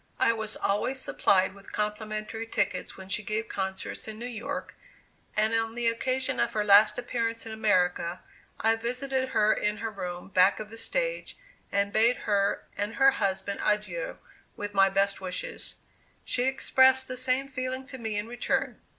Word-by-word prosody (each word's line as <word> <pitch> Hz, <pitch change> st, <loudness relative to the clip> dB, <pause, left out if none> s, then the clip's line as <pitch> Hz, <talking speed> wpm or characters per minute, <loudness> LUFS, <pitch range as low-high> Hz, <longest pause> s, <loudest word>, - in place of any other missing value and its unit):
I 230 Hz, -, +4 dB
was 220 Hz, -1 st, -5 dB
always 230 Hz, +7 st, 0 dB
supplied 190 Hz, -6 st, +2 dB
with 200 Hz, 0 st, -14 dB
complimentary 215 Hz, +1 st, -3 dB
tickets -, -, -1 dB
when 190 Hz, -1 st, -9 dB
she 200 Hz, +2 st, 0 dB
gave 215 Hz, +2 st, -2 dB
concerts 190 Hz, +1 st, -4 dB
in 215 Hz, -1 st, -6 dB
New 235 Hz, -, -6 dB
York, 240 Hz, -2 st, -5 dB, 0.6 s
and 215 Hz, +1 st, +3 dB
on 225 Hz, 0 st, 0 dB
the 240 Hz, -1 st, 0 dB
occasion 255 Hz, -, -1 dB
of 120 Hz, -, +1 dB
her 210 Hz, -, +1 dB
last 205 Hz, +1 st, +6 dB
appearance 230 Hz, -2 st, -2 dB
in 225 Hz, -, -7 dB
America, 180 Hz, -5 st, +1 dB, 0.4 s
I 225 Hz, 0 st, +3 dB
visited 260 Hz, +3 st, -2 dB
her 210 Hz, -3 st, +4 dB
in 210 Hz, 0 st, -1 dB
her 225 Hz, +1 st, -3 dB
room 180 Hz, -3 st, -6 dB
back 185 Hz, +1 st, +4 dB
of 215 Hz, 0 st, -7 dB
the 225 Hz, -, -9 dB
stage, -, -, -2 dB, 0.3 s
and 200 Hz, 0 st, +1 dB
bade 230 Hz, +3 st, +4 dB
her 200 Hz, -1 st, +1 dB
and 205 Hz, +2 st, -3 dB
her 270 Hz, 0 st, +6 dB
husband 195 Hz, -2 st, -1 dB
adieu, 215 Hz, -, -1 dB, 0.4 s
with 205 Hz, 0 st, -5 dB
my 195 Hz, -1 st, +5 dB
best 195 Hz, +1 st, +1 dB
wishes. 185 Hz, -1 st, -3 dB, 0.5 s
She 245 Hz, -, 0 dB
expressed 260 Hz, 0 st, +4 dB
the 255 Hz, -, -4 dB
same 255 Hz, +2 st, +1 dB
feeling 260 Hz, 0 st, -4 dB
to 260 Hz, -1 st, -8 dB
me 220 Hz, -2 st, -2 dB
in 205 Hz, -, -1 dB
return. 240 Hz, +1 st, -2 dB
220 Hz, 170 wpm, -28 LUFS, 200-245 Hz, 0.6 s, last